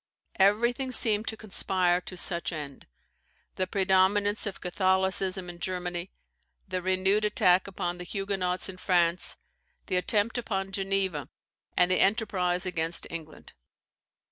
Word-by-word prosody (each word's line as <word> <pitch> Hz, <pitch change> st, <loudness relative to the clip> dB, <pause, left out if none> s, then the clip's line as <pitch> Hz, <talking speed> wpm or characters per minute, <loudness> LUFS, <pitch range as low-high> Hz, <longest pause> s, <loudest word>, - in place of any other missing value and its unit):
Everything 235 Hz, +7 st, +2 dB
seemed 220 Hz, -3 st, +3 dB
to 220 Hz, -, -3 dB
conspire 185 Hz, -4 st, 0 dB
to 185 Hz, -, -8 dB
such 170 Hz, 0 st, +4 dB
end; 145 Hz, -4 st, -8 dB, 0.7 s
the 185 Hz, -, -1 dB
predominance 195 Hz, +2 st, +2 dB
of 200 Hz, -, -6 dB
Catholicism 190 Hz, 0 st, +1 dB
in 175 Hz, -1 st, -9 dB
Germany, 180 Hz, 0 st, -4 dB, 0.6 s
the 185 Hz, -1 st, -3 dB
renewed 190 Hz, +3 st, +1 dB
attack 185 Hz, -3 st, +3 dB
upon 175 Hz, -2 st, -4 dB
the -, -, -5 dB
Huguenots 190 Hz, -1 st, -2 dB
in 190 Hz, -1 st, -8 dB
France, 175 Hz, -2 st, +1 dB, 0.5 s
the 185 Hz, -, 0 dB
attempt 210 Hz, +5 st, 0 dB
upon 195 Hz, -4 st, -3 dB
Geneva, 190 Hz, -7 st, -1 dB, 0.5 s
and 180 Hz, 0 st, +4 dB
the 185 Hz, -, +2 dB
enterprise 190 Hz, -4 st, +1 dB
against 165 Hz, -2 st, -2 dB
England. 160 Hz, -2 st, -9 dB
185 Hz, 125 wpm, -28 LUFS, 180-200 Hz, 0.7 s, such